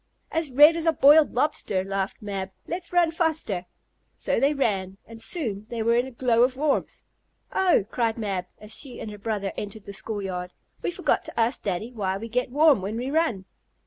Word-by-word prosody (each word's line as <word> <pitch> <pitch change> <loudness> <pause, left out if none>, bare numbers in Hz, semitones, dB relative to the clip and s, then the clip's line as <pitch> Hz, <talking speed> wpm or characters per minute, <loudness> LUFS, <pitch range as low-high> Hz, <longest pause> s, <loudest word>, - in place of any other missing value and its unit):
"As 325 -2 -1
red 295 +5 +7
as 335 0 -1
a 325 - +5
boiled 295 +1 +6
lobster!" 240 -8 0
laughed 195 +1 -3
Mab. 195 -2 -4 0.2
"Let's 345 0 -4
run 350 -2 +3
faster!" 315 - -1 0.5
So - - -1
they 280 - +3
ran, 195 -9 -1
and 225 0 -10
soon 225 - -2
they 230 -2 -3
were 230 +1 +3
in 245 +2 +1
a - - -9
glow 235 -1 +2
of 255 +1 +3
warmth. 295 0 -1 0.5
"Oh!" 360 - +3
cried 230 -1 -1
Mab, 195 -5 -3
as 215 +1 -7
she 260 -4 -6
and 215 - -6
her 210 - -10
brother 205 -2 -2
entered 205 0 -6
the 200 - -8
school 205 +1 -3
yard, 180 -1 -5 0.3
"we - - -1
forgot 350 - 0
to - - -6
ask 230 +3 +2
Daddy 200 +4 -3
why 195 -4 -2
we 225 +3 -7
get 250 +2 -1
warm 290 -3 +4
when 205 +4 -4
we 255 +3 -3
run." 290 - 0
230 Hz, 205 wpm, -25 LUFS, 200-290 Hz, 0.5 s, red